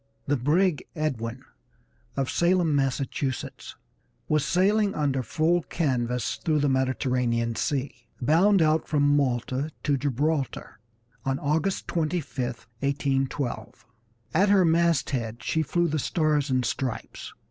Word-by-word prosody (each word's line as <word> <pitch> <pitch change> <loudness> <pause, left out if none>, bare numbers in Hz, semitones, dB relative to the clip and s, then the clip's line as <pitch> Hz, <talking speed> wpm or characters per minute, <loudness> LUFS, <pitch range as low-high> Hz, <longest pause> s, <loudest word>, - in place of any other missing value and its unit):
II 60 0 -43
The - - +2
brig 155 +4 +2
Edwin 130 -5 -3 0.7
of 135 -1 0
Salem, 170 -3 +2
Massachusetts, 135 -1 -2 0.5
was 150 -2 +2
sailing 200 +3 +2
under 140 -3 0
full 165 +7 +1
canvas 125 - -1
through 155 -3 +2
the 145 0 +2
Mediterranean 125 -3 0
Sea, 140 +1 -1 0.3
bound 170 +8 +4
out 155 0 +2
from 145 -1 +3
Malta 130 +1 0
to 145 -2 +2
Gibraltar, 140 -1 -2 0.4
on 135 0 0
August 160 +7 -1
25, 155 -5 -1 0.3
1812. 135 -2 -2 0.5
At 195 +5 +4
her 195 -3 +5
masthead 140 -9 +1
she 160 - 0
flew 175 +3 +1
the 155 -1 -1
Stars 150 -1 +1
and 130 -1 +1
Stripes. 130 -1 -4
145 Hz, 120 wpm, -26 LUFS, 130-160 Hz, 0.7 s, her